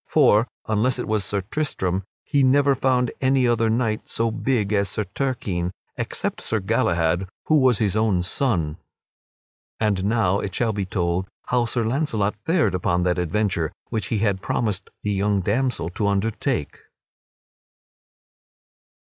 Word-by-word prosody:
For, 120 -6 +4 0.2
unless 110 +4 +1
it 125 - -4
was 110 -2 +1
Sir 100 0 -1
Tristram, 95 -6 -2 0.2
he 145 -2 +1
never 140 +2 +4
found 125 -2 +1
any 130 -1 +3
other 115 -1 +2
knight 110 -1 -1
so 115 0 0
big 110 -3 0
as 100 -2 +2
Sir 105 - -1
Turquine 100 -5 -2 0.3
except - - -3
Sir 110 - -1
Galahad, 90 -3 +1 0.2
who 155 - +4
was 130 -4 +4
his 105 -2 +1
own 105 -5 +2
son. 90 - 0 1.0
And 105 -4 +1
now 100 -3 +2
it 95 -2 -4
shall 115 -2 +1
be 100 -2 -2
told 90 -1 -1 0.2
how 120 -1 +2
Sir 115 0 -1
Launcelot 110 -5 0
fared 160 - +2
upon 90 -1 +1
that 90 0 +1
adventure 90 -2 0 0.2
which 110 -4 -2
he 110 - 0
had 100 -2 0
promised 105 -5 -1
the 105 - 0
young 100 0 +1
damsel 115 -2 0
to 100 +3 -1
undertake. 100 +2 -1
105 Hz, 145 wpm, -23 LUFS, 95-120 Hz, 1.0 s, For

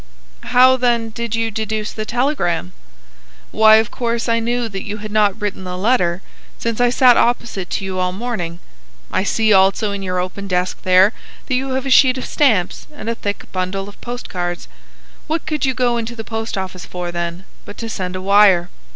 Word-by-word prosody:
"How, 255 +1 +5
then, 235 -3 +1
did 235 0 -3
you 225 0 -1
deduce 215 0 -3
the 215 0 -5
telegram?" 240 - -1 0.8
"Why, 220 0 +6
of 220 0 +2
course 235 -1 -2
I 230 0 +2
knew 240 +1 -1
that 195 -3 -5
you 210 0 -5
had 215 0 -7
not 210 -1 +2
written 200 -2 -4
a 180 0 -4
letter, 185 -4 +1 0.3
since 230 0 -2
I 245 - +4
sat 245 0 +5
opposite 225 -6 0
to 195 - -3
you 190 -1 -3
all 180 0 0
morning. 185 -5 -4 0.5
I - - +1
see 220 +1 +2
also 195 +2 +3
in 200 0 -4
your 185 -1 -2
open 185 +2 -4
desk 180 -1 -1
there 185 +4 +5 0.3
that 265 - -3
you 260 +1 -1
have 265 +1 -2
a 270 - -2
sheet 260 0 +6
of 255 - -4
stamps 220 - +1
and 295 -6 -7
a - - 0
thick 205 -3 -4
bundle 185 +1 -3
of 205 - -14
post 245 +1 -6
cards. 175 -1 -4 0.6
What 320 +1 -2
could 300 -3 -1
you 260 - 0
go 245 -1 +1
into 235 +1 -4
the 225 - -6
post 225 -1 -4
office 185 -1 -5
for, 175 -1 -5
then, 170 +1 -4 0.2
but 205 - -11
to 230 - -5
send 185 -4 -4
a 185 - -4
wire? 195 -3 +5
215 Hz, 205 wpm, -19 LUFS, 185-240 Hz, 0.8 s, Why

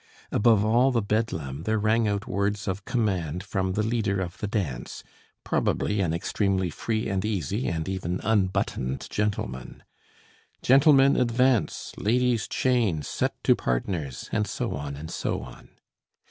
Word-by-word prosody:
Above 105 -1 +4
all 120 +4 +4
the 120 - +2
Bedlam 80 -11 -2
there 110 +5 0
rang 110 +1 +2
out 100 0 -1
words 105 -3 -1
of 95 +1 -3
command 90 - -1
from 95 -2 -1
the 105 - 0
leader 110 -3 0
of 90 -2 -4
the 105 - -2
dance, 80 - -3 0.4
probably 105 -1 0
an 85 -4 +1
extremely 95 +1 0
free 110 +8 -2
and 95 -1 -1
easy, 105 - -1
and 80 0 -2
even 90 -2 -2
unbuttoned 95 - 0
gentleman: 65 -12 -3 0.8
"Gentlemen 135 +1 +6
advance, 125 -1 +1
ladies' 120 +1 +1
chain, 115 - +1
set - - -1
to - - +5
partners!" 70 +1 -2
and 105 -2 0
so - - -3
on, 70 0 -5
and 80 +3 -8
so - - -2
on. 60 - -12
100 Hz, 145 wpm, -26 LUFS, 85-110 Hz, 0.8 s, Gentlemen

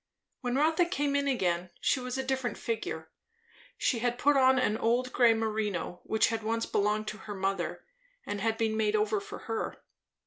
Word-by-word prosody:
When 245 -1 -2
Rotha 315 +5 +3
came 290 -5 0
in 280 0 +1
again, 180 -9 0
she 270 - +2
was 250 0 -4
a 265 - -1
different 260 -2 -1
figure. 230 - -4 0.7
She 240 - +1
had 240 +1 0
put 290 +3 +3
on 260 -1 +5
an 235 -4 +2
old 245 +3 +1
grey 235 -2 +5
merino, 215 -5 -2
which 220 - +2
had 225 -1 -2
once 230 +1 -1
belonged 210 +1 0
to 215 - -7
her 205 - -3
mother 195 -2 -2 0.4
and 205 -1 -3
had 225 +1 +1
been 220 -1 0
made 215 -1 +1
over 210 0 +2
for 200 - -8
her. 225 -1 -3
225 Hz, 185 wpm, -30 LUFS, 215-260 Hz, 0.7 s, on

